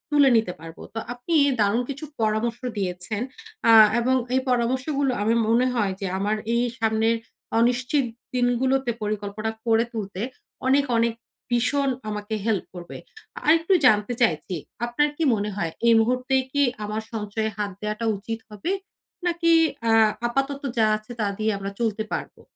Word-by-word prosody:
তুলে 285 -2 +6
নিতে 220 -5 0
পারবো। 165 0 -11
তো 225 - -3
আপনি 245 +7 -5 0.3
দারুণ 210 +3 +3
কিছু 280 +3 -5 0.2
পরামর্শ 220 +2 0 0.2
দিয়েছেন। 190 +2 -3 0.5
আ - - +9 0.3
এবং 255 +2 +2 0.2
এই 260 - +3
পরামর্শগুলো 255 +3 +1
আমি 220 +2 +2
মনে 235 +3 +3
হয় 205 -5 +1
যে 195 - -1
আমার 205 +2 0 0.2
এই 235 +1 +2 0.2
সামনের 225 0 +2 0.4
অনিশ্চিত 250 +4 +2 0.3
দিনগুলোতে 250 +1 +1
পরিকল্পনা 210 +1 -3
করে 225 0 +4
তুলতে 200 -4 -5 0.5
অনেক, 275 +2 +4
অনেক 230 0 +2 0.4
ভীষণ 270 +4 +1 0.2
আমাকে 210 +1 -4
হেল্প 220 -4 0
করবে। 175 -1 -8 0.5
আরেকটু 330 +4 +4
জানতে 210 0 +4
চাইছি, 180 -4 +1 0.3
আপনার 240 +5 +1
কি 330 - 0
মনে 210 0 -2
হয় 170 -5 -2 0.2
এই 230 - +7
মুহূর্তে 250 +3 0 0.2
কি 285 - +1 0.2
আমার 210 +1 -3
সঞ্চয়ে 220 0 -2
হাত 205 -1 -2
দেয়াটা 215 +2 -3
উচিত 225 +3 -5
হবে? 210 - -4 0.5
নাকি 340 -1 +2 0.4
আ - - +4 0.4
আপাতত 275 +3 -1 0.2
যা 220 - +5
আছে, 215 +2 -14
তা 215 - +1
দিয়ে 220 0 +1
আমরা 195 0 -5
চলতে 220 -2 0
পারবো? - - -5
225 Hz, 150 wpm, -24 LUFS, 210-255 Hz, 0.5 s, আ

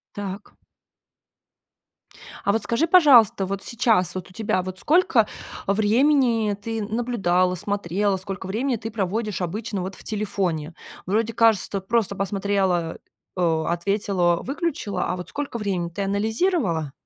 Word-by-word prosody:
Так. 200 0 -7 1.9
А 200 - +2
вот 225 0 0
скажи, 290 +9 +1
пожалуйста, 260 - +6
вот 195 0 -4
сейчас, 220 -7 +1
вот 185 0 -6
у - - -17
тебя, 205 -4 0
вот 185 0 -6
сколько 305 - +3 0.4
времени 225 +1 +3
ты 225 +2 -4
наблюдала, 195 -6 +1
смотрела, 200 0 -1
сколько 190 0 -6
времени 240 +7 -1
ты 225 +1 -6
проводишь 210 0 -2
обычно 205 +3 -3
вот 185 +1 -5
в - - -13
телефоне? 185 -7 -2 0.3
Вроде, 220 +4 0
кажется, 210 -3 +2
просто 205 0 0
посмотрела, 195 -4 0 0.4
э, 165 -3 +1
ответила, 175 0 +1
выключила, 275 - -2
а 180 - -1
вот 180 - -7
сколько 285 -4 -4
времени? 185 -5 -2
Ты 195 +4 -4
анализировала? 200 - 0
200 Hz, 130 wpm, -23 LUFS, 185-230 Hz, 1.9 s, пожалуйста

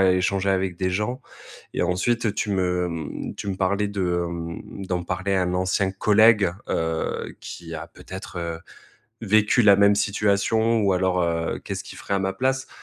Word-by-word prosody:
é 95 -1 +5
échanger 95 +1 +1
avec 95 -2 0
des 95 +1 0
gens. 105 +7 -2 0.5
Et - - 0
ensuite, 105 +6 +1
tu 105 - -2
me, 90 -2 0
mmh, 80 -3 -5
tu 100 - -5
me 95 - -2
parlais 100 +2 +1
de, 100 -1 -3 0.2
hem, 85 +3 -6
d'en 90 -1 -1
parler 95 +2 -1
à 95 - +2
un 90 0 -1
ancien 95 +1 +1
collègue, 105 -1 +4 0.2
heu, 80 0 -2
qui 85 -1 -8
a 80 - -6
peut-être, 95 0 -10
heu, 85 -1 -3 0.6
vécu 110 +2 +3
la 100 -1 +7
même 100 +1 +5
situation 105 +3 +2
ou 100 -1 +3
alors, 90 0 +1
heu, 85 -1 -1
qu'est-ce - - -5
qu'il - - -10
ferait - - -3
à 100 - +2
ma 95 0 0
place? 130 +4 0
95 Hz, 180 wpm, -24 LUFS, 90-105 Hz, 0.6 s, la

